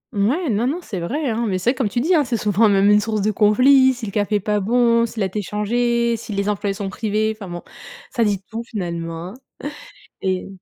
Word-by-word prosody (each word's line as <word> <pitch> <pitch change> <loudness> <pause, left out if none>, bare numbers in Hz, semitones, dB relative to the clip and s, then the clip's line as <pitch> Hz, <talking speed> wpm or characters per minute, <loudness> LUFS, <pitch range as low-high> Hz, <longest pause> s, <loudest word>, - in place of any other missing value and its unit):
Mouais, 255 - +1
non, 220 +4 +1
non, 300 - -1
c'est 195 - -5
vrai, 275 - -2
hein 230 +1 -1
mais 190 -3 0
c'est 205 +7 +2
vrai, - - -5
comme 255 -6 0
tu 240 - -1
dis, 320 +9 +2
c'est 235 -1 -1
souvent 210 +1 +3
même 200 0 +4
une 210 - +6
source 215 0 -1
de 215 - +2
conflits. 255 +6 +5
Si 240 - -6
le 200 - -5
café 205 +1 0
est 205 - +3
pas 210 +1 0
bon, 235 +2 +3
s'il 220 -2 -3
a - - +2
été 190 +3 -3
changé, 235 +3 0
si 220 -1 -7
les 200 +1 -1
employés 200 -1 -1
en 205 - -5
sont - - -3
privés, 215 +2 -1
enfin 210 -3 -9
bon 175 0 -6 0.5
ça 235 - +1
dit 205 -3 +1
tout 225 +1 -3
finalement 170 -5 -5
hein - - -10 0.9
et 185 -1 -1
215 Hz, 245 wpm, -21 LUFS, 200-235 Hz, 0.9 s, une